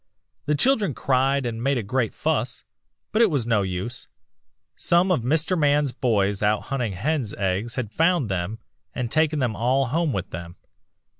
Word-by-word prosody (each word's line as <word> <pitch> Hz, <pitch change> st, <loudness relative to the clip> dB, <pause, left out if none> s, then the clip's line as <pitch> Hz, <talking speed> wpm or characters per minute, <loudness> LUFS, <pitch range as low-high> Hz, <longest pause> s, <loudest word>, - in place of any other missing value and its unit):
The 150 Hz, -, +2 dB
children 210 Hz, -, +2 dB
cried 135 Hz, +1 st, +1 dB
and 115 Hz, -1 st, -3 dB
made 135 Hz, +2 st, +1 dB
a 120 Hz, -, -2 dB
great 120 Hz, +2 st, -1 dB
fuss, -, -, -1 dB, 0.5 s
but 220 Hz, -, +2 dB
it 230 Hz, -, +6 dB
was 140 Hz, -8 st, 0 dB
no 115 Hz, -3 st, +2 dB
use. 95 Hz, +6 st, -4 dB, 0.7 s
Some 175 Hz, +2 st, +2 dB
of 165 Hz, -, +2 dB
Mr. 160 Hz, +9 st, +1 dB
Man's 145 Hz, -3 st, +2 dB
boys 105 Hz, -7 st, 0 dB
out 105 Hz, 0 st, +2 dB
hunting 125 Hz, -7 st, -2 dB
hen's 125 Hz, -, -1 dB
nests 100 Hz, +4 st, -1 dB
had 120 Hz, -6 st, -3 dB
found 165 Hz, -2 st, +2 dB
them 95 Hz, +2 st, -3 dB, 0.4 s
and 120 Hz, -2 st, -3 dB
taken 155 Hz, -1 st, +2 dB
them 125 Hz, -6 st, 0 dB
all 130 Hz, +2 st, +1 dB
home 160 Hz, +2 st, +1 dB
with 95 Hz, -4 st, -4 dB
them. 85 Hz, +1 st, -7 dB
125 Hz, 170 wpm, -24 LUFS, 105-150 Hz, 0.7 s, it